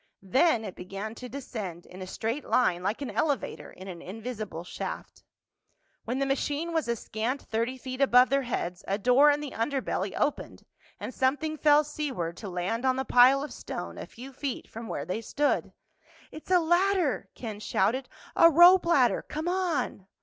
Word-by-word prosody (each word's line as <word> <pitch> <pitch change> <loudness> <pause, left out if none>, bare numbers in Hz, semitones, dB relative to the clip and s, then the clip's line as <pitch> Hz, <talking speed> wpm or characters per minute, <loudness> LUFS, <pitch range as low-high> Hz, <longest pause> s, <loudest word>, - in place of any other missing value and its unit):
Then 240 - +3
it 190 - -6
began 195 +4 -6
to 250 +2 -9
descend 215 -11 -6
in 185 +1 -12
a 185 - -6
straight 230 +9 -3
line 180 -8 +2
like 205 +9 -2
an 275 - -4
elevator 285 -4 -2
in 185 - -12
an 175 -3 -8
invisible 215 -3 -6
shaft. 180 - -7 0.8
When 245 +3 -2
the 275 - +1
machine 290 +4 -1
was 320 -5 0
a 235 - +1
scant 230 +5 -3
thirty 230 +4 -2
feet 255 +1 -6
above 250 -2 +6
their 275 0 +3
heads 180 -8 -4
a 195 - 0
door 250 +7 +5
in 290 0 +2
the 290 -3 -5
underbelly 230 -5 -2
opened 295 - -2 0.3
and - - -6
something 290 +4 0
fell 300 0 +5
seaward 275 - -4
to 205 - -7
land 185 +7 -2
on 260 -1 +2
the 265 0 -2
pile 260 +3 +6
of 295 - -6
stone - - -6
a - - -7
few 260 +3 -11
feet 270 0 -4
from 230 +1 -8
where 140 - -4
they 185 +6 -3
stood. 290 +6 0 0.6
"It's 310 - -11
a 365 -1 +5
ladder!" 345 -1 +1
Ken 220 -4 -6
shouted. 235 +5 0 0.3
"A 335 - +8
rope 345 +3 +7
ladder! 270 -8 +3
Come 310 +3 -5
on!" 350 - -1
255 Hz, 180 wpm, -28 LUFS, 215-295 Hz, 0.8 s, A